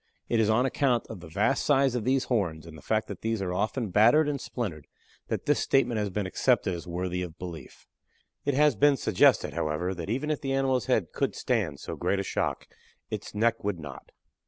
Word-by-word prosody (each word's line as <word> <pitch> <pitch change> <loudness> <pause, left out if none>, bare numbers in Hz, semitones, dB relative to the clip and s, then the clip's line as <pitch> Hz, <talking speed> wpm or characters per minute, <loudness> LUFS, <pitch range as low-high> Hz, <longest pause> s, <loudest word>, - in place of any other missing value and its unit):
It 115 - +2
is 110 -1 +3
on 115 +4 +3
account 130 -3 +1
of 110 - -7
the 85 - -11
vast 105 +11 +1
size 135 -3 +3
of 120 -3 -2
the 130 +1 +3
horns, 95 - -1
and 80 -1 -11
the 80 - -12
fact 110 0 0
that - - -8
these 115 -1 -1
are 95 -2 -2
often 110 +2 -1
battered 120 - +5
and 140 -2 -2
splintered 90 - -5 0.4
that - - -3
this 145 - +2
statement 130 -4 +2
has 105 -1 -1
been 100 +1 -2
accepted 100 0 +1
as 85 +1 -7
worthy 90 +1 -2
of 90 -2 -6
belief. 85 -3 -9 0.6
It 145 -2 0
has 150 -2 +4
been 145 +6 +4
suggested, - - +3
however, 80 +5 -1
that 85 0 -6
even 135 +7 -1
if 150 - -2
the 135 -2 -2
animal's 130 -4 +1
head - - +1
could - - -1
stand 100 - -1
so - - -6
great 100 - 0
a - - -1
shock, - - -2 0.4
it's - - -6
neck 115 +2 +1
would 100 -4 -2
not. 70 -5 -10
110 Hz, 215 wpm, -28 LUFS, 90-130 Hz, 0.6 s, battered